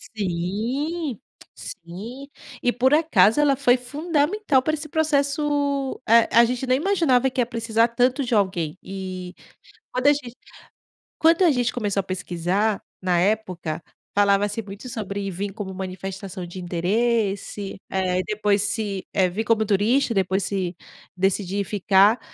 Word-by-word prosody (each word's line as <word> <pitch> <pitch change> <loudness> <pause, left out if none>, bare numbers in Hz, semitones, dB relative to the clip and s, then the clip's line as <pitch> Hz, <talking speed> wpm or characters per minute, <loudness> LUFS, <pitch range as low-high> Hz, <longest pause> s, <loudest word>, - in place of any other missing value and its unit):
Sim, 225 - -2 0.4
sim. 220 +11 -9 0.3
E, 245 - +2
por 260 +3 +2
acaso, 295 - +4
ela 285 -2 +4
foi 255 -2 +3
fundamental 295 +4 0
pra 310 +4 0
esse 310 0 -6
processo 285 -2 0
Eh, 230 +1 +5
a 235 +1 +7
gente 250 +2 -3
nem 255 +1 +3
imaginava 300 -8 +2
que 255 - 0
ia - - +2
precisar 230 -1 +1
tanto 250 +4 +1
de 240 -3 0
alguém. 185 -5 0
E, 185 -2 -6 0.6
quando 255 +2 0
a 290 - +8
gen 280 -4 -4 0.9
quando 330 +3 +4
a 345 - +6
gente 245 -3 +1
começou 205 -4 -1
a - - -16
pesquisar, 185 +3 -1 0.2
na 180 -2 +1
época, 180 -5 -1 0.3
falava-se 205 +2 +2
muito 200 +4 -10
sobre 200 -3 -4
vim 195 +3 -3
como 195 -1 -6
manifestação 190 0 -6
de 175 +2 -9
interesse. 200 +3 -1
É. 185 -1 0
E - - 0
depois 210 -1 +1
se 205 -1 -2
eh, 190 -2 +3
vir 205 +5 -2
como 220 -1 +2
turista. 225 +5 +2
Depois, 190 0 +1
se 190 -2 -2 0.4
decidir 195 +1 0
ficar 200 +3 +3
215 Hz, 145 wpm, -23 LUFS, 190-260 Hz, 0.9 s, a